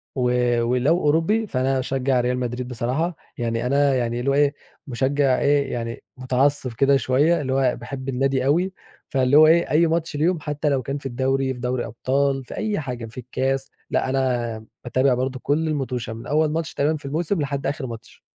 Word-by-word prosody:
و 125 -1 +2
ولو 125 +8 +2
أوروبي، 165 +9 +2
فأنا 130 -1 0
أشجع 130 -1 0
ريال 125 +1 0
مدريد 125 0 -3
بصراحة. 130 +8 -2 0.2
يعني 115 0 -2
أنا 140 +1 +3
يعني 120 -1 -1
اللي 135 +3 -1
هو - - +2
إيه، 145 0 +3 0.3
مشجع 135 +1 +1
إيه، 140 -1 +2
يعني 115 -1 -4
متعصب 130 0 +1
كده 135 +3 +3
شويّة، 145 +6 +2
اللي 130 -1 -2
هو 130 -2 +2
باحب 130 +2 -6
النادي 135 0 0
أوي. 175 +7 +2 0.4
فاللي 130 +1 +3
هو 155 0 +8
إيه، 170 +2 +4
أي 165 +2 +4
ماتش 165 -1 -1
ليهم، 165 +3 +1
حتّى 150 0 -2
لو 135 -2 +1
كان 140 +4 -4
في 140 - -12
الدوري، 130 +1 0
في 125 - -10
دوري 125 0 -2
أبطال، 135 +4 0
في - - -9
أي 215 -5 -1
حاجة، 125 -5 -5
في 115 +3 -13
الكاس، 130 +2 -2 0.2
لأ، - - 0
أنا 120 -4 -1 0.2
باتابع 130 +1 +2
برضو 130 +1 -2
كل 155 +4 0
الموتُشة 130 -6 -2
من 115 +1 -9
أول 155 +1 +2
ماتش 160 0 -3
تقريبًا 155 +2 +1
في 145 - -13
الموسم 160 +4 -1
لحد 140 0 -3
آخر 140 -2 -3
ماتش. 115 0 -10
135 Hz, 195 wpm, -23 LUFS, 125-145 Hz, 0.4 s, هو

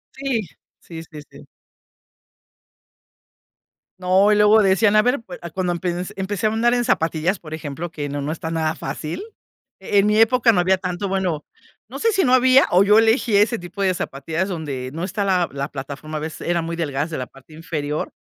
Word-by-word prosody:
Sí, 265 -4 -1 0.4
sí, 165 -2 -9
sí, 155 -2 -11
sí. - - -15 2.5
No, 190 +3 +3
y - - +4
luego 210 +1 +5
decían, 195 +2 +3
a 215 - +7
ver, 250 +2 +1
pue 185 - -10
cuando 185 -2 -1
empens 175 +2 -3
empecé 200 +2 -1
a - - +2
andar 235 +2 +2
en 245 0 +1
zapatillas, 165 -1 0
por 155 -2 -10
ejemplo, 160 +2 -6
que 145 -3 -5
no 145 0 -4
no 145 +2 -3
está 160 0 -5
nada 160 -1 -1
fácil. 150 - -5 0.6
E 205 - +1
en 200 - +3
mi 210 0 +2
época 230 +1 +5
no 195 - +1
había 190 +1 +2
tanto, 185 +1 -3
bueno, 185 -5 -2 0.4
no - - -7
sé 455 - +2
si 390 -3 +2
no 250 - +3
había, 255 +1 +6
o 180 +2 +5
yo 210 +2 +5
elegí 225 0 +3
ese 210 +3 +2
tipo 175 +3 -8
de 190 -1 +2
zapatillas 165 +3 -3
donde 145 -8 -4
no 165 +2 -5
está 200 +2 -2
la 185 -3 +2
la 140 0 -4
plataforma, 145 +3 -6
a - - -5
veces 160 0 -6
eran 170 -1 0
muy 165 0 -4
delgadas 150 -1 -2
de 155 - -3
la 125 - -4
parte 135 +3 -18
inferior. 155 -2 -4
180 Hz, 200 wpm, -21 LUFS, 155-210 Hz, 2.5 s, a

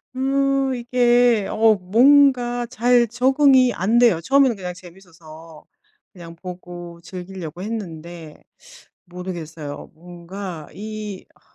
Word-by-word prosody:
음 275 0 0
이게 240 -3 +2
어 220 0 +4
뭔가 245 +4 +3
잘 245 0 +2
적응이 260 +2 +3
안 215 +7 +1
돼요. 230 -9 +4
처음에는 270 +4 +3
그냥 180 -3 -6
재밌어서 165 -3 -15 0.5
그냥 170 -2 -12
보고 175 -1 -10
즐기려고 180 -2 -8
했는데 170 -6 -8 0.6
모르겠어요 165 -5 -8
뭔가 175 0 -9
이 210 -1 -7
아 - - -29
195 Hz, 225 characters per minute, -21 LUFS, 175-245 Hz, 0.6 s, 어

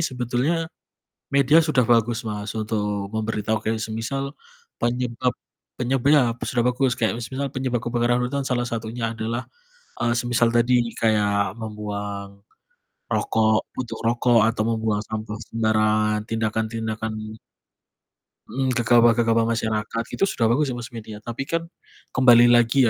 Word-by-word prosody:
sebetulnya 130 +3 0 0.7
media 140 +4 +5
sudah 150 -7 +2
bagus 120 0 +2
Mas 105 -1 -4
untuk 105 -2 -2
memberitahu, 110 0 -1
kayak 110 +1 -1
semisal 115 +6 -3 0.5
penyebab 125 +1 0 0.5
penyeb 125 +1 0
iya 130 -6 +5
p 120 - -20
sudah 120 -1 0
bagus. 125 +1 +1
Kayak 115 0 0
semisal 135 +3 -4
penyebab 130 -2 -1
kebakaran 120 0 +1
hutan 140 +3 -2
salah 125 -2 -1
satunya 115 0 -3
adalah, 115 +2 -3 0.6
eee, 120 0 +2
semisal 120 -1 +2
tadi 120 +1 +3 0.2
kayak 105 -3 +1
membuang 100 -2 -6 0.7
rokok 110 -1 +2
puntung 115 -3 -5
rokok, 120 0 +3
atau 110 -1 0
membuang 110 -2 0
sampah 110 0 -5
sembarangan, 110 -1 +2
tindakan-tindakan 110 -1 -3 1.2
Mhm, 130 -1 0
gegabah-gegabah 115 -1 +4
masyarakat 110 +1 -2
itu - - +3
sudah 115 - +1
bagus 145 +5 +2
ya 130 - -3
Mas 120 -1 -7
media. 110 -3 -9
Tapi 120 +4 -5
kan 165 +2 -3 0.4
kembali 120 -2 +6
lagi 120 +2 +5
115 Hz, 130 wpm, -23 LUFS, 110-125 Hz, 1.2 s, kembali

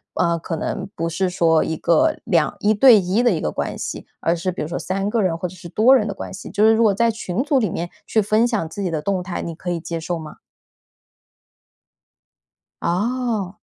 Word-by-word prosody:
呃， 170 -1 +1
可 165 0 -4
能 160 - -4
不 165 - -2
是 185 +3 -1
说 165 -3 +3
1 160 - -3
个 310 - +2
2 170 -9 +1
1 210 +1 +3
对 220 0 +7
1 190 +5 +1
的 245 - +4
一 175 -8 0
个 75 - -2
关 - - -3
系。 - - -6
而 170 - +1
是 175 +2 -2
比 175 - -4
如 - - -4
说 165 - -4
3 195 +1 -2
个 230 - +1
人 175 -4 0
或 180 - -3
者 175 - -12
是 175 -1 -10
多 235 +9 +5
人 215 -5 +2
的 200 - -4
关 - - -7
系， 190 - -8
就 210 - 0
是 220 - +6
如 225 - +2
果 210 -3 +4
在 230 +2 +2
群 220 +1 -3
组 290 -3 +2
里 215 -6 0
面， 170 +1 -3 0.2
去 220 - +1
分 215 +3 +3
享 220 -9 -1
自 200 +5 -6
己 185 - -1
的 155 -3 -3
动 195 -2 0
态， 180 0 -5
你 170 - -5
可 175 +2 -7
以 175 -1 -1
接 165 +1 -5
受 170 +2 -3
吗？ 155 -2 -9 2.4
哦。 210 +1 -1
185 Hz, 230 characters per minute, -21 LUFS, 170-220 Hz, 2.4 s, 对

